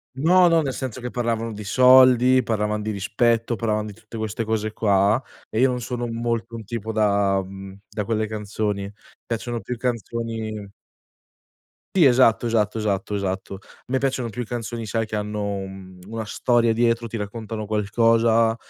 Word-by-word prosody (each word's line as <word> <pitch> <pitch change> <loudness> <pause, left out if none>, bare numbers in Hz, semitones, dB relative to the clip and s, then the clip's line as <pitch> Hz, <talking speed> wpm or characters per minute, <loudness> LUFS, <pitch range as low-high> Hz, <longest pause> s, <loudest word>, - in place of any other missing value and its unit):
No, 175 +6 +5
no, 165 -1 +4
nel 135 -2 -2
senso 130 -2 -5
che 125 0 -5
parlavano 115 -2 -2
di 105 0 -7
soldi, 130 +2 +6
parlavan 105 -2 -1
di 105 - -3
rispetto, 115 +3 +1
parlavano 110 -1 -1
di - - -9
tutte 110 +3 -11
queste 110 +1 -3
cose 110 -1 -2
qua, 100 +2 +2 0.3
e 110 - -2
io 130 +2 +5
non 125 -1 -2
sono 120 0 -3
molto 115 0 -3
un 115 - -7
tipo 110 +1 -4
da 100 -2 +2
uhm, 95 0 -7
da 105 - -4
quelle 110 0 0
canzoni. 105 -1 -3 0.4
Piacciono 120 0 -3
più 120 +4 -5
canzoni 115 -3 -4 1.2
Sì, 175 -5 +6
esatto, 125 -3 +5
esatto, 110 -2 +1
esatto, 105 -1 -1
esatto. 95 -1 -3
A - - -21
me 130 - 0
piacciono 130 -3 -1
più 120 +3 -5
canzoni 115 0 -5
sai 115 +2 -1
che 110 - -4
hanno 105 -1 -2
un 95 -1 -8
una 115 +1 -4
storia 120 +2 +2
dietro, 115 0 +1
ti 115 - -5
raccontano 110 +1 -5
qualcosa 115 +2 +3
110 Hz, 165 wpm, -23 LUFS, 105-120 Hz, 1.2 s, soldi